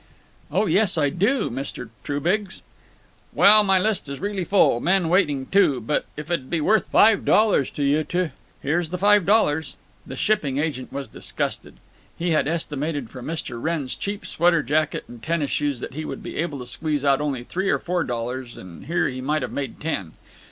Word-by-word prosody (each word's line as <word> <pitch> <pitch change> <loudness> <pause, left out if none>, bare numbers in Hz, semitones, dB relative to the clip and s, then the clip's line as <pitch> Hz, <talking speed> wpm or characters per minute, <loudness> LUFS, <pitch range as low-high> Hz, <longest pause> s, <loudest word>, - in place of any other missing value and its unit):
"Oh 190 +8 +1
yes, 190 0 +2
I 145 -3 +2
do, 205 - +1
Mr. 130 -2 -6
Trubiggs." 180 +8 -1 0.7
"Well, 215 +1 +7
my 195 -2 +3
list 200 -5 0
is 140 - -5
really 200 -1 -2
full—men 180 -1 +3
waiting, 150 -7 +2
too—but 145 - +1
if 150 +3 -6
it 170 - +3
'd 130 -3 -15
be 170 - 0
worth 215 +8 +2
five 215 -1 +5
dollars 210 - +3
to 145 - -4
you 145 +3 +2
to—" 180 -2 -1 0.3
"Here's 160 +3 0
the 180 - -3
five 205 -1 +4
dollars." 160 -7 +2 0.3
The - - -7
shipping 150 -11 0
agent 145 -4 -2
was 140 -1 -5
disgusted. - - -4 0.4
He 175 +1 -1
had 155 - +2
estimated 150 -5 -3
from 125 -2 -8
Mr. 155 -7 -5
Wrenn's 155 -4 -2
cheap 200 +1 -5
sweater 170 -2 +2
jacket 150 +4 0
and 120 -1 -12
tennis 160 -1 -1
shoes 145 -4 -1
that - - -6
he 155 +3 -4
would - - -6
be - - -7
able 155 -3 -2
to - - -7
squeeze 145 +3 -2
out 140 0 +3
only 140 -5 -2
three 190 +9 -2
or - - +3
four 175 -1 -1
dollars, 120 0 -4
and 90 +4 -11
here 170 - +1
he 130 -1 -5
might 150 +2 0
have - - -4
made 135 -4 -5
ten. 105 - -3
155 Hz, 190 wpm, -23 LUFS, 140-185 Hz, 0.7 s, Well